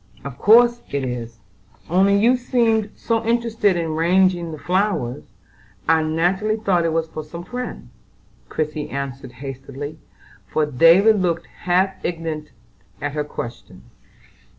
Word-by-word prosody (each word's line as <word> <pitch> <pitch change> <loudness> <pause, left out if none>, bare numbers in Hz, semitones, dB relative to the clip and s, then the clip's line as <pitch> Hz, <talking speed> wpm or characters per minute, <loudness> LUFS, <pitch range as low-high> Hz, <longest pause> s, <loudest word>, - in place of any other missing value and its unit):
"Of 140 -2 -8
course 240 +3 +6
it 140 -1 -2
is; 120 -2 -5 0.5
only 195 +4 +4
you 235 +5 +4
seemed 230 -4 +1
so 230 -1 -1
interested 225 -4 +1
in 170 - -1
arranging 175 +1 +2
the 155 - -6
flowers, 180 - -1 0.6
I 160 0 +4
naturally 180 +7 +1
thought 190 -6 +1
it 165 - +1
was 165 0 0
for 155 -1 -7
some 170 +3 -8
friend," 250 +6 -6 0.6
Christie 150 -1 -3
answered 135 -2 -5
hastily, 135 +3 -7 0.5
for 155 - +1
David 170 - +5
looked 170 -2 0
half 185 +2 -1
indignant 165 -3 -4 0.5
at 145 +3 -3
her 150 +1 -2
question. 120 -4 -8
170 Hz, 130 wpm, -21 LUFS, 150-205 Hz, 0.6 s, course